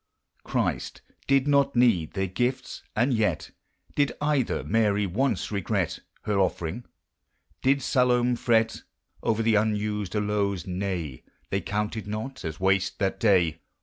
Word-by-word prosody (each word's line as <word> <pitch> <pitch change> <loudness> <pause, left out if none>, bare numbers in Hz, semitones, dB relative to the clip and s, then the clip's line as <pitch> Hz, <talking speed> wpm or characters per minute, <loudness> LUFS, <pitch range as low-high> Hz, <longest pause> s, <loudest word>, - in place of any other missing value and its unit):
Christ - - -2 0.2
did 135 0 +3
not 140 -1 +3
need 115 -10 +3
their 95 - 0
gifts; 125 +8 -2
and 120 +4 +2
yet 105 -9 0
I - - -6
>id 145 - +2
oil 145 -3 +2
her - - -2
Mary 105 -2 +2
once 110 +2 0
regret 100 -4 -1 0.2
Ber 105 -2 0
offering? 95 +3 -1 0.8
Did 135 0 +2
Salome 125 -1 +3
fret 115 -2 +1 0.4
Over 115 0 +1
the 115 0 +3
unused 105 -1 0
aloes? 105 -2 0
Nay! 90 -7 -3
' - - -40
They - - 0
counted 105 +1 -3
not 110 +5 -5
as 80 -2 -5
wash', 95 0 +2
that 95 -1 -1
day. 90 -7 +3
105 Hz, 145 wpm, -26 LUFS, 95-125 Hz, 0.8 s, did